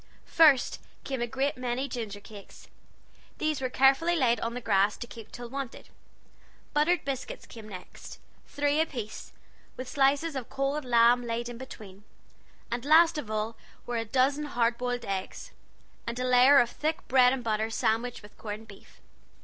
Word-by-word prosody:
First 300 -6 +4 0.2
came 265 -3 -4
a 240 - 0
great 265 +3 -1
many 250 +2 -2
ginger 220 -6 -5
cakes. 200 -1 -13 0.7
These 310 -3 -1
were 255 - -1
carefully 270 +7 +4
laid 240 -7 +2
on 230 +1 -3
the - - -3
grass 205 -3 +2
to - - -6
keep 225 -1 -12
till 240 -1 -8
wanted: 270 0 -7 0.8
buttered 305 +3 +2
biscuit 270 -2 -5
came 220 -2 -11
next 185 -3 -10 0.3
three 290 +1 +1
apiece, 240 -9 -5 0.5
with 255 - -6
slices 280 +3 +2
of 260 -3 -5
cold 275 +1 -2
lamb 240 0 +4
laid 235 0 -3
in 240 -1 -8
between; 205 -6 -11 0.7
and 240 0 -2
last 320 +2 +5
of 230 - -7
all 215 +1 -2 0.3
were 240 -1 -2
a 225 - -1
dozen 270 +6 +1
hard 240 -4 +1
boiled 245 -1 -2
eggs, 195 -1 -5 0.6
and 235 +1 -3
a 250 - -2
layer 255 +3 +6
of 240 -3 +4
thick 315 +1 -3
bread 250 -1 +5
and 260 -2 -2
butter 220 -1 0
sandwiched 230 +1 -1
with 205 - -15
corn 215 0 -6
beef. 205 -3 -17
245 Hz, 165 wpm, -28 LUFS, 230-275 Hz, 0.8 s, layer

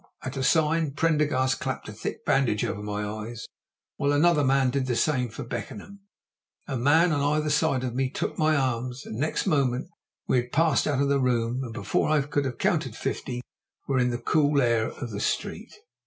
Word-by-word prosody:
At 130 +2 -5
a 135 - -2
sign, 155 +1 +2
Prendergast 150 -7 +1
clapped - - -4
a - - -7
thick - - -6
bandage 125 -6 +2
over 105 - -3
my 105 0 -3
eyes, 110 +2 -6 0.5
while 140 0 +1
another 150 +1 +4
man 135 -1 +3
did 135 -1 -1
the 120 - 0
same 125 -2 +1
for 110 - -7
Beckenham; 125 - -7 0.7
a 135 - -3
man 155 +8 +4
on 145 -2 +1
either 150 +1 +1
side 150 -4 +2
of 125 -2 -2
me 130 +1 0
took - - -3
my 155 0 +2
arms, 125 -2 -1
and 110 - -6
next 155 +3 -1
moment 130 -4 +1 0.4
we - - +3
had 125 0 -1
passed 160 -2 +2
out 140 -2 +1
of 140 - 0
the 140 0 +3
room, 125 0 0
and 120 - -6
before - - 0
I 155 -2 +3
could 145 0 -1
have 130 -2 -3
counted - - 0
fifty 125 0 -3 0.5
were 135 -2 +1
in 125 0 +2
the 120 - -2
cool 145 +3 +2
air 115 -3 +2
of 120 - -7
the 100 - -4
street. - - -3
135 Hz, 200 wpm, -26 LUFS, 120-150 Hz, 0.7 s, another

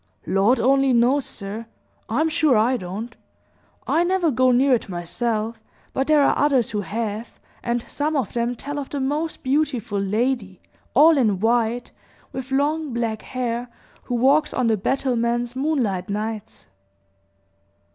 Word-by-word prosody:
"Lord 195 +7 +3
only 270 +2 +3
knows, 245 +4 +3
sir. 215 +3 -6 0.4
I'm 320 - +1
sure 305 -5 +3
I 235 +4 +3
don't. 210 +3 -6 0.7
I 335 - +2
never 350 -2 +1
go 255 +1 +3
near 260 +2 +4
it 230 - 0
myself; 220 +5 -3 0.3
but 270 - 0
there 305 -2 +5
are - - +3
others 275 -6 +2
who 210 -1 -1
have, 215 +2 -4 0.2
and 240 0 -1
some 300 +2 -2
of 270 - -1
them 240 0 -1
tell 290 +4 -5
of 275 - -6
the 285 - -3
most 295 +4 -2
beautiful 260 -7 0
lady, 210 -1 -1 0.4
all 305 +2 +7
in 210 -7 +2
white, 235 +2 +1 0.4
with 260 0 -6
long, 290 +1 0
black 230 -2 -2
hair, 245 -1 -3 0.4
who 245 - -2
walks 280 +5 +3
on 255 - +1
the 225 -1 +3
battlements 240 +1 -1
moonlight 255 -11 -1
nights." 215 +1 -5
245 Hz, 145 wpm, -23 LUFS, 220-275 Hz, 0.7 s, all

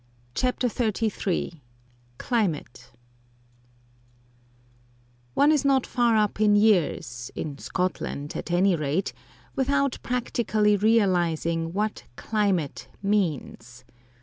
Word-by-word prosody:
CHAPTER 250 - 0
XXXIII 210 - -1 0.6
CLIMATE 155 - -2 2.4
One 290 +2 +5
is 300 -3 +2
not 270 -2 +3
far 235 -2 +2
up 210 0 +1
in 210 -1 +5
years, 165 - +2
in 145 -3 -5
Scotland 180 -5 -3
at - - -5
any 180 +2 +3
rate, 155 +4 -1 0.4
without 280 0 +1
practically 220 -4 +1
realising 175 -6 +1
what 210 +3 -2
climate 195 -9 -1 0.2
means. 150 - -2
200 Hz, 90 wpm, -26 LUFS, 165-225 Hz, 2.4 s, One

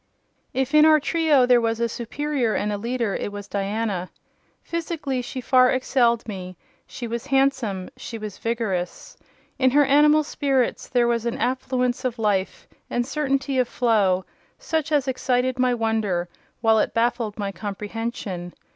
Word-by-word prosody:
If 265 +1 -1
in 305 0 +7
our 310 0 +6
trio 300 -4 +3
there 245 -1 +5
was 225 0 0
a 235 - +1
superior 245 +1 -2
and 210 0 -1
a - - -2
leader, 235 -2 -1
it - - -3
was 205 -1 -7
Diana. 200 -2 -2 0.5
Physically, 315 -6 -3
she 255 +1 -6
far 255 0 +5
excelled 245 -3 +1
me: 185 -3 -7 0.3
she 245 - -7
was 235 +3 -4
handsome; 265 -9 +1
she 230 - -7
was 215 -3 -7
vigorous. 215 -7 -3 0.4
In 260 -1 +5
her 290 +3 +4
animal 300 +2 +5
spirits 270 -4 0
there 245 -2 +2
was 235 -1 0
an 235 - -2
affluence 250 0 -1
of 250 -2 -2
life 205 -4 -1 0.2
and 240 0 0
certainty 275 -1 -1
of 250 - +2
flow, 205 -7 +2 0.3
such 320 - -2
as 285 -3 +2
excited 255 0 0
my 250 -1 +3
wonder, 220 -6 0 0.3
while 225 -1 +4
it - - -1
baffled 230 -2 0
my 200 -2 -2
comprehension. 205 -3 -5
240 Hz, 155 wpm, -23 LUFS, 215-265 Hz, 0.5 s, in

